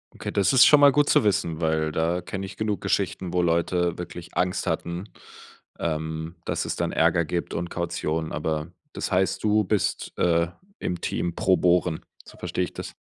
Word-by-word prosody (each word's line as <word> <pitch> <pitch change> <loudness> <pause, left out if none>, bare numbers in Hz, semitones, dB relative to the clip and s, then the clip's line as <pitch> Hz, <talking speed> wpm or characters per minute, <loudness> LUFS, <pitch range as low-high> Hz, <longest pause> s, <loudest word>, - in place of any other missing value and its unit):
Okay, - - -5
das 100 +2 +2
ist 130 0 +8
schon 150 - +7
mal 145 0 +8
gut 145 +1 +3
zu - - +4
wissen, 85 -5 0
weil 80 -1 +1
da 85 +3 0
kenne 95 +2 -5
ich 95 0 -10
genug 105 -3 -1
Geschichten, 90 -2 -1
wo 90 0 +1
Leute 85 +1 +1
wirklich 85 -1 -8
Angst 90 0 0
hatten, 85 +1 -2 0.8
ähm, 80 +1 -3
dass - - -1
es - - -2
dann - - -1
Ärger 85 +1 +3
gibt 85 +3 -3
und 85 +1 -3
Kaution, 80 -2 -2
aber 75 +2 -2 0.2
das - - -4
heißt, 95 0 +1
du 105 0 +3
bist, 105 0 -1
äh, 85 -1 +2 0.3
im 90 - -3
Team 85 -1 -2
pro 95 -1 +3
bohren, 90 -2 +2 0.2
so - - -15
verstehe - - -2
ich - - -11
das? - - -7
85 Hz, 190 wpm, -25 LUFS, 80-95 Hz, 0.8 s, ist